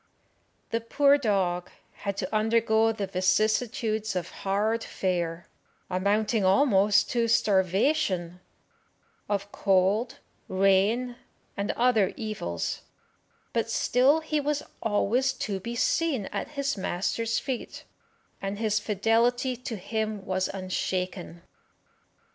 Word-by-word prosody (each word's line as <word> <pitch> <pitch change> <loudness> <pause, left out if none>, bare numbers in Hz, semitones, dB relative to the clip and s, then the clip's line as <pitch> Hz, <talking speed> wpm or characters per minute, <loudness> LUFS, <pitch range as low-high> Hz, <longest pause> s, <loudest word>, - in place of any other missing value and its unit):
The 230 - 0
poor 280 +5 +3
dog 190 -7 0 0.2
had 200 -1 -5
to - - -3
undergo 225 0 +3
the 215 -3 -3
vicissitudes 215 +3 0
of 180 -2 -2
hard 215 +4 -1
fare, 175 -2 -2 0.4
amounting 205 +3 +1
almost 200 0 +4
to 235 -2 +1
starvation, 190 - +1 0.9
of 200 0 -2
cold, 200 +4 +1 0.3
rain, 200 +6 +2 0.4
and 200 +1 -3
other 235 -5 +2
evils, 210 - -3 0.7
but 230 -1 0
still 265 +7 +3
he 310 -1 -1
was 295 0 -1 0.2
always 230 +5 +1
to 195 -2 -3
be 235 +5 -5
seen 270 -3 +1
at - - -3
his 280 0 0
master's 210 +4 -1
feet, 260 -4 -4 0.6
and 195 +1 -3
his 215 0 +1
fidelity 230 +5 +1
to 240 -1 -6
him 215 0 -3
was 185 0 0
unshaken. 185 -2 -4
215 Hz, 105 wpm, -27 LUFS, 190-235 Hz, 0.9 s, almost